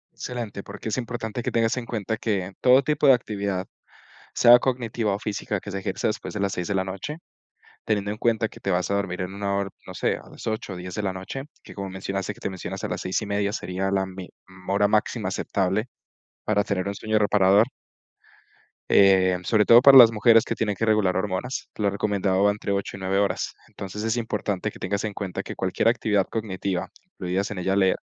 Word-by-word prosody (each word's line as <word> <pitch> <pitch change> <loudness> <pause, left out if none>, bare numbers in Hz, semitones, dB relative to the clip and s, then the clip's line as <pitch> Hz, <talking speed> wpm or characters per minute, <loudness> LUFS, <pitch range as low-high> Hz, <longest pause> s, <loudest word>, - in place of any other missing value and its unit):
Excelente, 115 -5 -5
porque 110 - -7
es - - -2
importante 120 -2 -4
que - - -2
tengas 115 -1 +1
en 125 - -3
cuenta 110 -1 -3
que 100 -4 -2
todo 130 +2 +6
tipo 150 +1 +1
de 135 - +9
actividad, 100 -6 -2 0.7
sea 120 0 +7
cognitiva 120 -5 -1
o - - -3
física, 105 0 -3
que 100 - -8
se 100 - -3
ejerce - - -2
después - - -3
de - - -4
las 100 -1 0
6 90 -1 -3
de 100 - -1
la 95 - +1
noche, 100 - -6 0.7
teniendo 105 -2 0
en 105 - -5
cuenta 115 0 +1
que - - -15
te 100 - -1
vas 90 -1 0
a - - 0
dormir 100 -2 -2
en 90 +1 -4
una 100 0 -2
hora, 100 0 -2 0.2
no - - -9
sé, - - 0
a - - -12
las - - -10
8 110 -3 -3
o - - -6
10 90 0 -7
de 105 - -2
la 95 - 0
noche, 95 +8 -6 0.2
que - - -12
como 100 -1 -5
mencionaste, 95 0 -4
que - - -19
te - - -3
mencionas 95 -2 -6
a - - -1
las - - -4
6:30 100 +1 -1
sería 95 -2 -3
la 95 -1 +1
me 95 -1 -9 0.2
mm, 95 0 -13
hora 100 +1 +3
máxima 105 +1 0
aceptable 95 +4 -1 0.6
para 105 -1 +2
tener 100 -1 -2
un 100 - -3
sueño 110 +1 0
reparador. 105 +1 +4 1.2
Eh, 95 -2 +5
sobre 105 +2 +3
todo 120 +1 +8
para 135 0 +9
las 115 -3 +10
mujeres 115 +1 +5
que - - -3
tienen 105 -2 -1
que 115 - -1
regular 105 -4 +2
hormonas, 100 +6 -3
lo 105 -2 +1
recomendado 100 -1 0
va 100 - +5
entre 100 -1 -3
8 100 0 -3
y - - -11
9 95 +1 -1
horas. 100 -2 0
Entonces 100 +2 -7
es 115 +2 0
importante 110 -3 -2
que - - -14
tengas 100 +2 -2
en 105 - -3
cuenta 95 -1 -4
que - - -8
cualquier 95 +3 0
actividad 105 -4 +2
cognitiva, 100 -4 -3 0.2
incluidas 90 +2 -2
en 100 - -4
ella 95 +2 0
leer, 95 -2 +3
100 Hz, 220 wpm, -24 LUFS, 95-110 Hz, 1.2 s, las